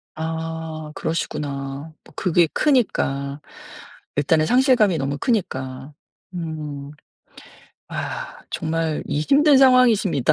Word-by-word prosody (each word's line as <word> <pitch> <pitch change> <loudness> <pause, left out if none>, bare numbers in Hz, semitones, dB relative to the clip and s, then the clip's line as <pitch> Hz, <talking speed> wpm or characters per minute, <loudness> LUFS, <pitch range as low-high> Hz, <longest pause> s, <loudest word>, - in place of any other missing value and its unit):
아 160 -1 -5
그러시구나. 145 -2 -4
뭐 - - -19
그게 175 -2 +3
크니까. 140 - +1 0.7
일단은 155 +2 +2
상실감이 245 - +4
너무 140 0 -2
크니까. 135 - -2 0.4
음. 155 -4 -5 1.0
아 - - -5
정말 160 -1 -2
이 145 0 -1
힘든 285 - +5
상황이십니다. 240 - +4
160 Hz, 215 characters per minute, -22 LUFS, 145-200 Hz, 1.0 s, 힘든